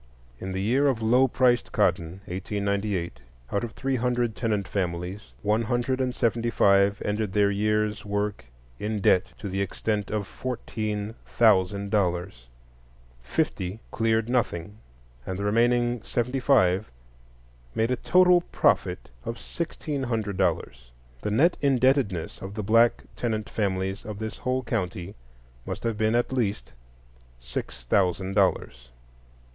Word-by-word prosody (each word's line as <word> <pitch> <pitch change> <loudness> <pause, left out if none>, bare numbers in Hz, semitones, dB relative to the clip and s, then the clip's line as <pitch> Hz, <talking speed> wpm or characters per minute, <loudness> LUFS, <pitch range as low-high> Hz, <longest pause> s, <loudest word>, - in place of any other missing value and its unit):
In 95 - -5
the 95 +1 -2
year 130 +7 +3
of 120 -5 0
low 125 +4 +5
priced 125 -1 +2
cotton, 85 +4 0
1898, 100 -1 -2 0.3
out 100 - 0
of 115 -1 -5
three 135 -1 -1
hundred 120 -2 0
tenant 105 -5 -1
families 90 +1 -3
one 105 +2 +2
hundred 120 +3 0
and 125 -1 -1
seventy 115 0 +1
five 100 -2 +4
ended 105 -1 -1
their 100 -1 +3
year's 105 +1 0
work 105 - -2 0.3
in 105 0 -2
debt 95 -2 +3
to 105 - -6
the 95 +1 -2
extent 105 +1 -2
of 105 -2 -2
fourteen 110 -3 -4
thousand 100 -2 +3
dollars; 90 - -1 0.7
fifty 95 - -2
cleared 110 -1 +1
nothing, 105 -5 -1 0.4
and 95 +4 -4
the 100 - -3
remaining 120 +2 +2
seventy 125 +5 -1
five 110 -7 +3 0.9
made 115 +2 +1
a - - +3
total 180 +5 +5
profit - - +1
of 115 - -4
sixteen 155 -2 -4
hundred 110 -5 -2
dollars. 65 -9 -1 0.3
The 105 - -2
net 150 +12 +3
indebtedness 130 - +2
of 95 +1 -7
the 105 - -3
black 115 +3 +4
tenant 110 -3 -2
families 95 -1 -1
of 105 -2 -6
the 110 +1 -3
whole 130 +3 -2
county 90 -5 -3 0.5
must - - -6
have 115 -1 0
been 110 +1 +2
at 120 +2 +1
least 110 - -1 0.7
sixty - - -6
thousand 95 +3 +1
dollars. 80 - 0
105 Hz, 140 wpm, -26 LUFS, 95-120 Hz, 0.9 s, low